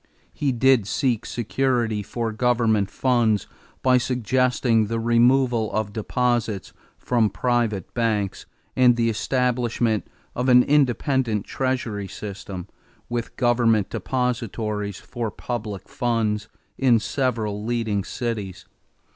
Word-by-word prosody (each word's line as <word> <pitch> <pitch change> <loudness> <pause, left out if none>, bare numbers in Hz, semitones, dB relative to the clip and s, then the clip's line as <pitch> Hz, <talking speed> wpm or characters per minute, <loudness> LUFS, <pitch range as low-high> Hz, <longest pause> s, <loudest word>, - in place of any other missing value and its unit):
He 140 -2 0
did 125 -3 +3
seek 120 0 0
security 120 -2 0
for 115 +2 -3
government 110 -3 +2
funds 115 -6 +1 0.4
by 130 -1 +5
suggesting 125 -2 +1
the 115 +1 -2
removal 120 0 +3
of 110 -1 -2
deposits 115 -2 -1 0.2
from 115 -4 +1
private 120 -7 -1
banks 110 -5 -1 0.3
and 125 -1 +5
the 115 -1 +1
establishment 120 -2 0 0.3
of 125 +2 0
an 125 0 +7
independent 130 -5 +1
treasury 120 -6 -2
system, 95 -2 -7 0.4
with 120 -1 -3
government 115 -4 +2
depositaries 110 -3 -2
for 120 -3 -4
public 105 -2 -5
funds, 110 -3 -1 0.3
in 125 -3 +5
several 110 -5 -2
leading 110 -3 -1
cities. 105 -6 -4
115 Hz, 105 wpm, -23 LUFS, 105-125 Hz, 0.4 s, an